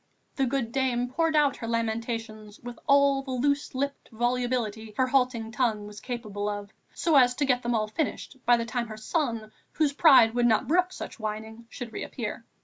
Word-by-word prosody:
The 270 -2 +1
good 245 -3 -1
dame 250 -2 0
poured 325 +4 0
out 290 -3 +3
her 230 - -6
lamentations 225 -2 -3
with 245 0 -8
all 280 -1 +4
the 270 - -11
loose 280 +2 0
lipped 280 +1 -3
volubility 235 -2 -1
her 260 - +3
halting 250 -4 +1
tongue 220 -3 0
was 210 0 -9
capable 210 -5 -4
of, 205 0 -5 0.2
so 325 -4 +2
as 250 -2 +5
to 290 - +1
get 250 -2 +2
them 240 0 -1
all 215 -1 0
finished 275 +2 -3
by 240 0 +5
the 230 - -2
time 235 +1 -2
her 215 -1 -8
son, 230 -3 -2 0.2
whose 300 -2 +1
pride 260 -7 +6
would 240 0 +3
not 220 -2 +2
brook 360 +3 +2
such 370 - -8
whining, 220 +1 -6
should 235 -2 -8
reappear. - - -5
240 Hz, 190 wpm, -27 LUFS, 220-270 Hz, 0.2 s, pride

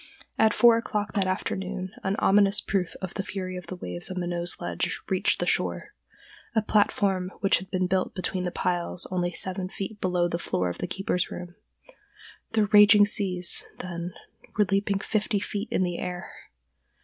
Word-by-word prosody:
At 220 0 +5
four 235 +1 +6
o'clock 215 -3 -2
that 195 -2 +1
afternoon 185 0 -3
an 190 0 0
ominous 200 0 +4
proof 185 -4 -2
of 185 - -4
the 195 - -2
fury 185 -2 -5
of 180 - -7
the 185 - -5
waves 90 - -1
on 185 -1 -3
Minot's 175 0 -1
Ledge - - -2
reached - - +2
the - - 0
shore—a 220 - -3
platform 195 -3 +2
which 195 - +3
had 185 +1 -11
been 185 -1 0
built 185 0 0
between 185 0 -2
the 180 - -1
piles 175 0 -1
only 175 -1 0
seven 185 +2 -3
feet 200 +2 -6
below 180 -1 +1
the 170 0 -3
floor 90 - -1
of 90 - -6
the - - -2
keeper's 185 -2 -1
room. 175 -1 -7 1.0
The 215 -2 +3
raging 205 0 +7
seas, 185 -3 +2
then, 175 -1 -6 0.4
were 210 - +5
leaping 200 +1 +1
fifty 210 +1 -1
feet 205 +2 -4
in - - +1
the 175 -1 -2
air. 180 -1 -5
185 Hz, 175 wpm, -26 LUFS, 180-205 Hz, 1.0 s, raging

